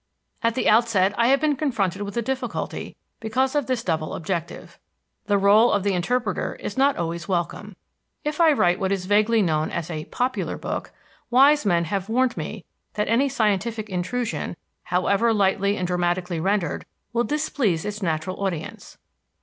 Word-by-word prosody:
At 230 Hz, -2 st, +1 dB
the 260 Hz, -, 0 dB
outset 215 Hz, -4 st, +4 dB
I 235 Hz, +3 st, +3 dB
have 275 Hz, +2 st, +4 dB
been 300 Hz, -1 st, +1 dB
confronted 205 Hz, -, -1 dB
with 205 Hz, +2 st, -5 dB
a 235 Hz, -, +1 dB
difficulty 260 Hz, 0 st, -4 dB, 0.2 s
because 255 Hz, +4 st, 0 dB
of 290 Hz, -4 st, 0 dB
this 255 Hz, -3 st, -1 dB
double 160 Hz, -5 st, -2 dB
objective. 170 Hz, 0 st, -5 dB, 0.5 s
The 205 Hz, -1 st, +3 dB
rôle 210 Hz, +4 st, +5 dB
of 200 Hz, -, +1 dB
the 200 Hz, -1 st, +1 dB
interpreter 205 Hz, +3 st, -1 dB
is 205 Hz, -, -6 dB
not 275 Hz, +1 st, +3 dB
always 170 Hz, -1 st, -3 dB
welcome. 185 Hz, +3 st, -3 dB, 0.5 s
If 300 Hz, +2 st, -1 dB
I 325 Hz, -2 st, +7 dB
write 180 Hz, -11 st, +2 dB
what 190 Hz, -1 st, 0 dB
is 190 Hz, -2 st, -1 dB
vaguely 215 Hz, +3 st, +3 dB
known 155 Hz, -3 st, 0 dB
as 170 Hz, 0 st, -4 dB
a 155 Hz, -1 st, -4 dB
"popular" 255 Hz, +1 st, -2 dB
book, -, -, -4 dB, 0.4 s
wise 275 Hz, +1 st, +5 dB
men 170 Hz, -3 st, +3 dB
have 195 Hz, +4 st, -3 dB
warned 255 Hz, +2 st, +2 dB
me -, -, -6 dB, 0.3 s
that 210 Hz, -, -1 dB
any 260 Hz, +5 st, +3 dB
scientific 215 Hz, -1 st, 0 dB
intrusion, 205 Hz, +7 st, -3 dB, 0.3 s
however 200 Hz, +5 st, +2 dB
lightly 200 Hz, 0 st, +2 dB
and 185 Hz, -, -1 dB
dramatically 175 Hz, -1 st, -1 dB
rendered, 190 Hz, -2 st, -1 dB, 0.3 s
will 235 Hz, 0 st, +2 dB
displease 270 Hz, -, 0 dB
its 210 Hz, 0 st, -4 dB
natural 185 Hz, +2 st, -2 dB
audience. 170 Hz, -5 st, -5 dB
205 Hz, 165 wpm, -24 LUFS, 180-240 Hz, 0.5 s, I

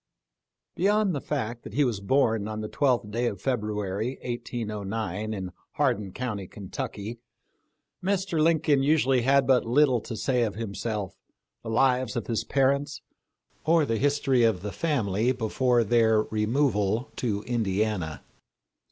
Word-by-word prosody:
Beyond 205 Hz, +1 st, +2 dB
the 140 Hz, -, -3 dB
fact 120 Hz, -5 st, -3 dB
that -, -, -10 dB
he 145 Hz, -, +4 dB
was 120 Hz, -7 st, 0 dB
born 110 Hz, -1 st, +1 dB
on 110 Hz, 0 st, -4 dB
the 105 Hz, -, -4 dB
12th 125 Hz, -5 st, +1 dB
day 120 Hz, +3 st, 0 dB
of 100 Hz, -, -3 dB
February, 105 Hz, -1 st, -2 dB
1809, 110 Hz, -4 st, -4 dB
in 95 Hz, -4 st, -4 dB, 0.2 s
Hardin 120 Hz, -9 st, 0 dB
county, 105 Hz, -5 st, -4 dB
Ken 95 Hz, -1 st, -10 dB
tucky, 115 Hz, -3 st, -5 dB, 0.8 s
Mr. 190 Hz, -4 st, 0 dB
Lincoln 155 Hz, -3 st, +3 dB
usually 135 Hz, -3 st, +3 dB
had 135 Hz, +2 st, +4 dB
but 130 Hz, -1 st, +4 dB
little 130 Hz, 0 st, +3 dB
to 115 Hz, -, -6 dB
say 125 Hz, 0 st, +1 dB
of 110 Hz, -3 st, 0 dB
himself, 105 Hz, -2 st, -4 dB, 0.4 s
the 115 Hz, -, -7 dB
lives 125 Hz, +1 st, +2 dB
of 120 Hz, -, -2 dB
his 115 Hz, -2 st, -1 dB
parents, 140 Hz, +1 st, 0 dB, 0.6 s
or 160 Hz, -1 st, +4 dB
the 115 Hz, -4 st, -1 dB
history 140 Hz, -3 st, +2 dB
of 110 Hz, -6 st, +2 dB
the 105 Hz, -, -3 dB
family 120 Hz, -, 0 dB
before 120 Hz, +1 st, +1 dB
their 110 Hz, -1 st, +3 dB
removal 110 Hz, 0 st, 0 dB
to 105 Hz, -4 st, -1 dB
Indiana. 105 Hz, -, -1 dB
120 Hz, 145 wpm, -27 LUFS, 105-135 Hz, 0.8 s, he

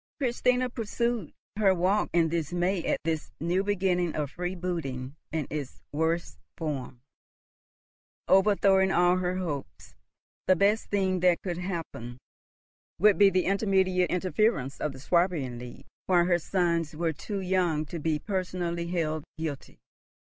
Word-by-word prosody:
Christina 250 Hz, -1 st, +1 dB
pursued 235 Hz, -3 st, -2 dB, 0.3 s
her 195 Hz, -3 st, +4 dB
walk 190 Hz, +4 st, +1 dB
in 165 Hz, -1 st, +3 dB
dismay 175 Hz, +3 st, -1 dB
at -, -, +1 dB
this 160 Hz, -1 st, -2 dB
new 175 Hz, +4 st, +1 dB
beginning 185 Hz, -4 st, 0 dB
of 150 Hz, -2 st, -2 dB
freebooting 170 Hz, -8 st, -4 dB, 0.2 s
in 155 Hz, -3 st, -1 dB
its 145 Hz, -4 st, -5 dB
worst 160 Hz, +3 st, -1 dB, 0.2 s
form, 135 Hz, -6 st, -4 dB, 1.2 s
overthrowing 195 Hz, -1 st, +4 dB
all 180 Hz, 0 st, +4 dB
her 180 Hz, 0 st, -1 dB
hopes. 155 Hz, -7 st, -5 dB, 0.5 s
The 185 Hz, -, +6 dB
best 205 Hz, +4 st, +2 dB
thing 190 Hz, -2 st, +1 dB
that 175 Hz, -1 st, +3 dB
could 175 Hz, -2 st, -3 dB
happen 165 Hz, -10 st, -5 dB, 0.8 s
would 205 Hz, +4 st, +5 dB
be 200 Hz, -1 st, +8 dB
the 185 Hz, -1 st, +1 dB
immediate 190 Hz, -2 st, +2 dB
interference 180 Hz, -, 0 dB
of 150 Hz, -, 0 dB
the 130 Hz, -, -11 dB
Swabian 155 Hz, -6 st, 0 dB
League, 125 Hz, 0 st, -10 dB, 0.2 s
while 175 Hz, -2 st, +4 dB
her 175 Hz, -1 st, +3 dB
sons 170 Hz, -3 st, 0 dB
were 165 Hz, 0 st, 0 dB
too 200 Hz, +7 st, -5 dB
young 180 Hz, -5 st, +1 dB
to 165 Hz, +4 st, -6 dB
be 155 Hz, 0 st, 0 dB
personally 180 Hz, -2 st, -3 dB
held 155 Hz, -3 st, -1 dB
guilty. 155 Hz, -4 st, -5 dB
175 Hz, 135 wpm, -28 LUFS, 160-190 Hz, 1.2 s, be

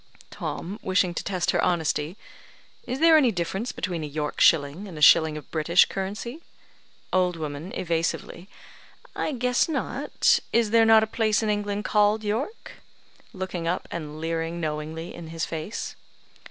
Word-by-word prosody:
Tom 195 Hz, +6 st, -5 dB
(wishing 185 Hz, -1 st, +1 dB
to -, -, -4 dB
test 185 Hz, -3 st, 0 dB
her -, -, +1 dB
honesty): 165 Hz, 0 st, 0 dB, 0.7 s
"Is 250 Hz, +1 st, -2 dB
there 325 Hz, 0 st, +7 dB
any 260 Hz, -6 st, +4 dB
difference 190 Hz, +6 st, -3 dB
between 175 Hz, -3 st, -4 dB
a -, -, -3 dB
York 150 Hz, 0 st, -4 dB
shilling 160 Hz, +5 st, +3 dB
and 175 Hz, -5 st, -9 dB
a -, -, -6 dB
shilling 155 Hz, 0 st, +6 dB
of 150 Hz, -, -11 dB
British 165 Hz, +3 st, +4 dB
currency?" 210 Hz, -, -5 dB, 0.7 s
Old 180 Hz, -1 st, +2 dB
woman 155 Hz, +2 st, -6 dB
(evasively): 170 Hz, +2 st, -2 dB, 0.7 s
"I -, -, -1 dB
guess 250 Hz, +2 st, +1 dB
not. 320 Hz, -, +1 dB
Is 230 Hz, -2 st, +2 dB
there 230 Hz, 0 st, +5 dB
not 220 Hz, -1 st, +7 dB
a -, -, +2 dB
place 220 Hz, 0 st, +1 dB
in 215 Hz, -, +1 dB
England 205 Hz, 0 st, -2 dB
called 210 Hz, +1 st, +2 dB
York?" 235 Hz, -, -4 dB, 0.5 s
(Looking 185 Hz, -3 st, -4 dB
up 180 Hz, +2 st, -2 dB
and 155 Hz, -2 st, -6 dB
leering 165 Hz, +1 st, -2 dB
knowingly 155 Hz, +1 st, -4 dB
in 170 Hz, -1 st, -9 dB
his 165 Hz, +1 st, -3 dB
face.) 160 Hz, +7 st, -5 dB
180 Hz, 155 wpm, -25 LUFS, 165-215 Hz, 0.7 s, there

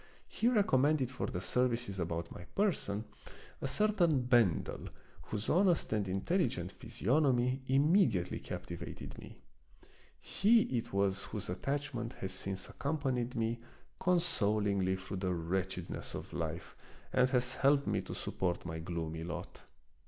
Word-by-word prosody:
He 230 Hz, -, 0 dB
recommended 150 Hz, -, +3 dB
for 130 Hz, -, -3 dB
the 90 Hz, -, -3 dB
services 120 Hz, -3 st, 0 dB
about 85 Hz, -1 st, -2 dB
my 90 Hz, -, -9 dB
person 115 Hz, -, 0 dB, 0.6 s
a -, -, -1 dB
certain 175 Hz, -4 st, +3 dB
Ben 120 Hz, -8 st, +4 dB
del, -, -, -7 dB, 0.4 s
whose 105 Hz, 0 st, -4 dB
honest 175 Hz, -, +3 dB
and 105 Hz, -2 st, 0 dB
intelligent 95 Hz, -, 0 dB
physiognomy 130 Hz, +1 st, +1 dB
immediately 135 Hz, -, +3 dB
captivated 85 Hz, -1 st, -7 dB
me. -, -, -11 dB, 0.8 s
He 225 Hz, +4 st, +4 dB
it 115 Hz, -, -2 dB
was 100 Hz, 0 st, +1 dB
whose 105 Hz, -4 st, -5 dB
attachment 135 Hz, +3 st, -2 dB
has 95 Hz, -, -5 dB
since 95 Hz, 0 st, -3 dB
accompanied 135 Hz, -4 st, -1 dB
me 115 Hz, 0 st, 0 dB, 0.4 s
consol 165 Hz, -, +2 dB
ingly 95 Hz, -2 st, +1 dB
through 95 Hz, +1 st, -6 dB
the 90 Hz, -1 st, 0 dB
wretchedness 90 Hz, +1 st, -3 dB
of -, -, -7 dB
life -, -, -4 dB, 0.4 s
and 125 Hz, 0 st, +4 dB
has 125 Hz, -1 st, +1 dB
helped 140 Hz, +1 st, +4 dB
me -, -, +1 dB
to -, -, -7 dB
support 90 Hz, -2 st, -2 dB
my 80 Hz, -1 st, -4 dB
gloomy 80 Hz, -1 st, -4 dB
lot. 85 Hz, -, -6 dB
120 Hz, 135 wpm, -34 LUFS, 95-140 Hz, 0.8 s, Ben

